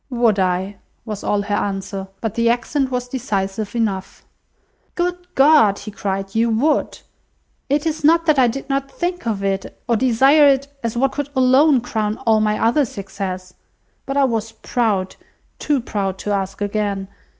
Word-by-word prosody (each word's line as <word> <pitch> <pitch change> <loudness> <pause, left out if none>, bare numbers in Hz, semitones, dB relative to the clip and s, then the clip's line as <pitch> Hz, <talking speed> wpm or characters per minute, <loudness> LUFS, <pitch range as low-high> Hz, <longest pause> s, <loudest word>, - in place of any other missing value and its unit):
"Would 235 -5 +2
I!" 185 +2 0 0.3
was 210 -3 -6
all 205 -1 0
her 205 0 -3
answer; 195 -1 -3
but 225 -3 -2
the 230 0 +2
accent 260 +3 0
was 250 -1 -3
decisive 215 -4 -3
enough. 200 -5 -2 0.7
"Good 355 0 -2
God!" 270 -8 +5
he 210 - -8
cried, 195 -1 -4
"you 230 +1 +2
would! 255 +8 +1 0.7
It 290 +3 +1
is 315 -2 -2
not 330 +2 +4
that 305 -4 +3
I 250 - +5
did 260 +4 -4
not 275 -1 -1
think 350 -1 -3
of 205 -3 -2
it, 195 0 -3
or 235 - +2
desire 265 +5 +5
it, 275 0 +3
as 230 0 -3
what 270 +2 +2
could 290 -1 -4
alone 260 +2 +4
crown 215 -3 -2
all 220 -1 +4
my 210 0 +1
other 235 +7 +3
success; 195 -4 -6 0.5
but 275 0 -2
I 280 - +4
was 225 -3 -1
proud, 215 -5 -1 0.4
too 295 -2 +1
proud 195 -5 -3
to 205 - -4
ask 195 0 -2
again. 205 -1 -2
225 Hz, 170 wpm, -20 LUFS, 200-270 Hz, 0.7 s, God